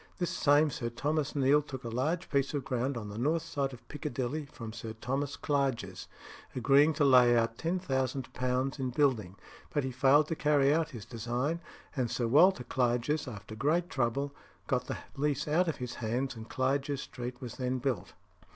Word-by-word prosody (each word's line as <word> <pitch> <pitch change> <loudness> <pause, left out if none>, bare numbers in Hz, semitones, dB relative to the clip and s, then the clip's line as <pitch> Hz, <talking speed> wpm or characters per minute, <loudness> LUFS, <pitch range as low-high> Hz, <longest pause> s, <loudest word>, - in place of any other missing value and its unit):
This 175 - -1
same 145 +1 +4
Mr. 120 -3 -3
Thomas 150 +1 -1
Neale 140 +1 +4
took 140 -2 -8
a 120 - -4
large 150 +9 -1
piece 140 +1 +1
of 140 - -1
ground 125 +1 -1
on 105 -3 -5
the 105 +2 -6
north 160 +6 +1
side 140 -3 -2
of 125 - -13
Piccadilly 145 0 -3
from 115 -6 -8
Sir 110 -1 -6
Thomas 135 +5 -2
Clarges, 130 - -1 0.5
agreeing 140 +5 +5
to 145 -1 +2
lay 125 -3 +6
out 115 0 0
£10,000 130 -5 -1
in 130 -1 -1
building; 120 -9 +1 0.4
but 145 - 0
he 130 - -2
failed 140 +4 +4
to 165 - 0
carry 145 -2 +3
out 160 0 +1
his 110 -5 -8
design, 125 +8 -2 0.3
and 125 -4 0
Sir 120 - -1
Walter 145 +5 +5
Clarges, 125 +4 0
after 105 -3 -8
great 155 +10 +1
trouble, 140 +3 0 0.3
got - - 0
the - - -3 0.2
lease 145 +1 0
out 170 +4 +3
of 160 - 0
his 125 -1 -5
hands, 120 +3 -2
and 110 0 -9
Clarges 135 +1 0
Street 125 0 -6
was 125 -3 -7
then 130 0 -1
built. 130 -2 -2
135 Hz, 180 wpm, -31 LUFS, 120-145 Hz, 0.5 s, lay